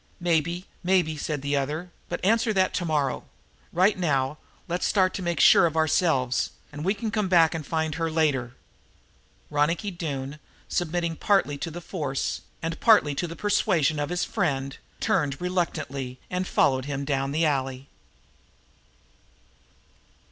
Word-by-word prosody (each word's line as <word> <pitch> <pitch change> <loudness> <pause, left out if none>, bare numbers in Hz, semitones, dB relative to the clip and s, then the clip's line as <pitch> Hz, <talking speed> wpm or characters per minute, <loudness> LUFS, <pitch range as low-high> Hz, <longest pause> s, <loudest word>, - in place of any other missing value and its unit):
"Maybe, 170 +1 0 0.2
maybe," 180 -4 +2
said 150 -2 -3
the 145 0 0
other, 150 +6 -2 0.2
"but - - -3
answer 225 +2 +3
that 185 -1 +2
tomorrow; 150 -6 0 0.5
right 185 +4 +3
now, 140 -4 0 0.3
let's 175 +1 -1
start 185 -2 +2
to - - -4
make 170 -3 -1
sure 170 - +7
of 160 0 -4
ourselves, 155 -5 +2 0.2
and 150 +1 -7
we 195 +4 +1
can 215 +1 -3
come 210 -2 0
back 165 -3 +5
to 165 - -3
find 160 +1 -2
her 165 +1 -1
later." 140 -7 0 1.0
Ronicky 165 +7 +1
Doone, 150 -5 -5 0.3
submitting 170 -1 -1
partly 195 -8 +2
to 165 - -3
the 170 +2 -7
force 145 -7 -3 0.2
and 165 0 -3
partly 215 -11 +5
to 175 +5 -2
the 165 - -7
persuasion 170 -8 +1
of 145 0 -2
his 180 0 -1
friend, 140 -9 -1 0.2
turned 145 -7 0
reluctantly 155 -8 -2
and 180 +1 -1
followed 130 -1 +2
him 140 -1 -3
down 135 -1 -1
the 160 +3 +1
alley. 135 -2 -1
160 Hz, 150 wpm, -26 LUFS, 140-180 Hz, 1.0 s, sure